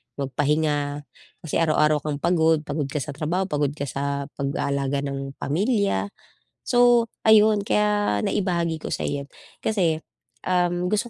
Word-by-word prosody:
magpahinga, 145 +1 -1 0.4
kasi 160 - -1
araw-araw 155 -2 +3
kang 150 0 -3
pagod, 160 -3 +3
pagod 145 -1 -3
ka 140 - -4
sa 145 - -6
trabaho, 155 +6 -1
pagod 145 -5 0
ka 145 - -4
sa 140 +1 -2 0.2
pag-aalaga 140 0 -1
ng 135 0 -5
pamilya. 195 - 0 0.6
So 245 -1 +4 0.2
ayun 215 -1 +6
kaya 205 - +1
naibahagi 170 -4 0
ko - - -5
sa'yo, 140 -1 -3 0.4
kasi 170 -7 +1 0.4
um, 180 -1 +1
gusto 215 +4 0
155 Hz, 130 wpm, -24 LUFS, 140-190 Hz, 0.6 s, ayun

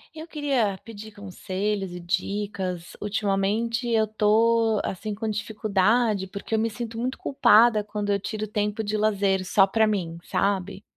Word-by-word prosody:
Eu 315 +1 -7
queria 265 - 0
pedir 220 -1 -9
conselhos 200 0 -3
e 180 - -6
dicas. 185 -1 -3
Ultimamente 210 +3 0
eu 220 -1 +2
tô, 220 +1 +3
assim, 210 +3 -4
com 220 +2 -4
dificuldade, 210 0 +1
porque 200 +3 -4
eu - - +1
me 225 +1 +1
sinto 225 +1 -6
muito 250 +3 -2
culpada 235 -5 +4
quando 205 0 -3
eu 200 - +1
tiro 215 +2 -4
tempo 210 +1 -2
de 210 0 -2
lazer 200 -3 +1
só 195 +2 +4
para 220 +3 +3
mim, 180 -6 -2
sabe, 200 0 -1
210 Hz, 155 wpm, -25 LUFS, 195-225 Hz, -, culpada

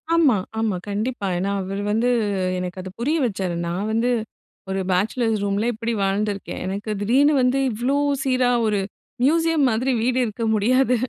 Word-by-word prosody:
ஆமா, 300 -8 +5 0.2
ஆமா, 220 -4 0
கண்டிப்பா. 210 +1 -2
ஏன்னா 195 +2 -1
அவரு 195 +2 -4
வந்து 230 +4 +2 0.5
எனக்கு 180 +1 -5
அது 185 - -7
புரிய 295 +7 +1
வச்சாரு. 190 -6 -2
நான் 190 +5 -2
வந்து 230 +3 +1 0.6
ஒரு 190 0 -1
பேச்சலர்ஸ் 220 +3 +1
ரூம்ல 205 +3 0
இப்டி 230 +1 -3
வாழ்ந்துருக்கேன். 200 +1 -2
எனக்கு 200 +3 -4
திடீர்னு 275 +8 +4
வந்து 255 +2 +2
இவ்ளோ 245 +6 0 0.3
சீரா 255 -2 +2 0.2
ஒரு 205 -2 +1 0.4
மியூசியம் 325 0 +3
மாதிரி 245 +4 0
வீடு 255 +1 +1
இருக்க 230 +1 -4
முடியாது 250 +4 +3
225 Hz, 150 wpm, -22 LUFS, 200-255 Hz, 0.6 s, ஆமா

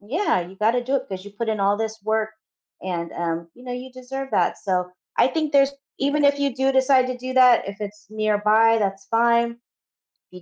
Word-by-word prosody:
Yeah, 265 - 0
you 180 +2 -9
gotta 230 +4 +1
do 270 +3 0
it 265 0 -5
because 190 -1 -6
you 205 - -10
put 230 +2 -4
in 215 -2 -1
all 200 +1 +2
this 220 0 -4
work 220 +1 0 0.5
and, 170 -2 -4
um, 170 0 -3
you 245 - -16
know, 250 - -7
you 250 +1 -7
deserve 265 +1 -7
that. - - +1
So, 180 -2 -1 0.3
I - - +4
think 310 -1 -2
there's 275 0 +4 0.3
even 285 +2 +1
if 285 0 +4
you 280 -1 +1
do 265 +1 +1
decide 265 -1 +4
to 255 -1 -4
do 255 +1 -6
that, 250 -2 +5
if 200 +1 -8
it's 210 0 -8
nearby, 215 +1 +3
that's 195 -1 -2
fine. 235 +1 +2 0.8
If 180 0 -12
225 Hz, 215 wpm, -23 LUFS, 205-260 Hz, 0.8 s, that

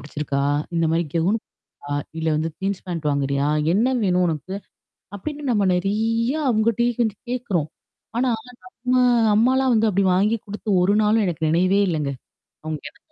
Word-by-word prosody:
பிடிச்சிருக்கா? 145 -1 -3 0.3
இந்த 165 - +2
மாரி 170 +1 +1
கவுனு 185 +7 +2 0.5
அ 145 - -1 0.2
இல்ல 160 0 -1
வந்து 160 +2 -1
ஜீன்ஸ், 195 0 -3
பேண்ட் 165 -4 -2
வாங்குறியா? 140 0 0 0.2
என்ன 220 +6 +3 0.2
வேணும் 180 -1 +2
உனக்கு? 160 +4 -4 0.6
அப்படின்னு 295 +9 -6
நம்ம 205 -4 +2
நெறயா 225 - 0
அவங்கட்டயே 230 +2 +2
வந்து 215 -3 -1
கேக்குறோம். 195 -11 -1 0.5
ஆனா, 255 0 +2 0.5
நம்ம 255 0 +3 0.3
அம்மாலாம் 260 +3 +3
வந்து 220 0 +3
அப்படி 195 0 +1
வாங்கி 210 +5 +2
கொடுத்து 210 +2 -8
ஒரு 200 +3 +3
நாளும் 215 0 +3
எனக்கு 165 -2 -1
நினைவே 185 +4 +3
இல்லங்க. 150 -4 -1 0.5
அவங்க 155 -2 -4
என்ன - - -27
195 Hz, 150 wpm, -22 LUFS, 165-225 Hz, 0.6 s, என்ன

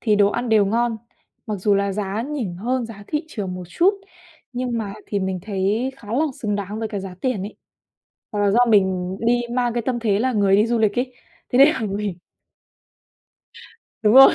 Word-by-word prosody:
thì 215 -3 +2
đồ 205 -1 +5
ăn 240 +3 -2
đều 215 -3 +4
ngon, 230 +2 +1 0.5
mặc 215 - -2
dù 200 +2 +2
là 200 0 +1
giá 205 +2 -2
nhỉnh 255 -9 -3
hơn 245 +5 -1
giá 205 -3 -10
thị 300 +1 -2
trường 195 -9 -4
một 180 - -6
chút 360 - +3 0.6
nhưng 245 -1 -2
mà 200 -2 -4
thì 205 - -1
mình 190 -1 -2
thấy 210 +6 -1
khá 210 - -14
là 280 +7 +2 0.2
xứng 210 -2 -1
đáng 205 +2 -4
với 225 - -2
cái 205 -2 -4
giá 190 -1 -7
tiền 250 -8 -1
ấy. 205 - -7 0.8
Hoặc 210 - -2
là 205 -1 +3
do 230 - +4
mình 190 -3 +2
đi 240 +1 +3
mang 245 -2 +1
cái 240 - 0
tâm 250 -2 0
thế 210 -3 +1
là 255 +2 +1
người 200 -3 +4
đi 210 +3 +3
du 235 - +1
lịch 215 +1 +2
ấy, 255 0 -2 0.4
thế 245 - +1
nên 275 - +10
là 310 - 0
mình 200 -3 -2 1.9
Đúng 215 +1 +4
rồi, 270 +1 +10
215 Hz, 215 wpm, -22 LUFS, 200-240 Hz, 1.9 s, nên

